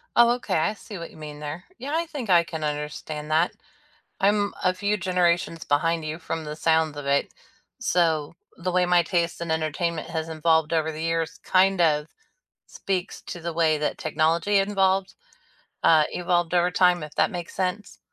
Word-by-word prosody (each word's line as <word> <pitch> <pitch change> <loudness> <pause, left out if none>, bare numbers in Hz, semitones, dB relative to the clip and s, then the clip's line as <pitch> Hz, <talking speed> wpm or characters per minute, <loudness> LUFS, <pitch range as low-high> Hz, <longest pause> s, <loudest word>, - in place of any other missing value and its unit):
Oh, 235 0 +6
okay, 215 -6 -3
I 185 +7 +1
see 210 -2 -10
what 170 - -8
you - - -16
mean 150 -1 -8
there. 150 +4 -6
Yeah, 285 +4 -5
I 335 +1 0
think 275 -9 -6
I 175 -2 +6
can 160 -2 -6
understand 150 0 -4
that. 160 +3 +3 0.7
I'm 205 +1 +2
a 185 0 +3
few 205 +3 0
generations 175 -3 0
behind 165 +2 +1
you 155 +1 -4
from 165 -1 -4
the 150 0 -6
sounds 160 -1 +2
of 145 -1 -6
it, 140 0 +1 0.5
so 160 -3 +1 0.2
the 185 +1 -3
way 180 0 +3
my 175 -1 +4
taste 170 -1 -1
in 170 -1 -4
entertainment 160 +1 -2
has 160 -1 -3
involved 160 0 +2
over 160 -1 +1
the 155 +1 -6
years 165 +1 -1
kind 190 0 +3
of 150 -2 +2 0.6
speaks 185 -2 -4
to 175 - -7
the 170 +1 -4
way 160 -1 +2
that 150 - -2
technology 165 +6 +1
involved, 195 -1 +1 0.7
uh 155 -2 +6
evolved 175 -1 0
over 175 0 +3
time, 180 -3 +3
if 150 0 -11
that 155 - +2
makes 175 -1 -6
sense. 190 +2 -3
170 Hz, 180 wpm, -25 LUFS, 155-185 Hz, 0.7 s, Oh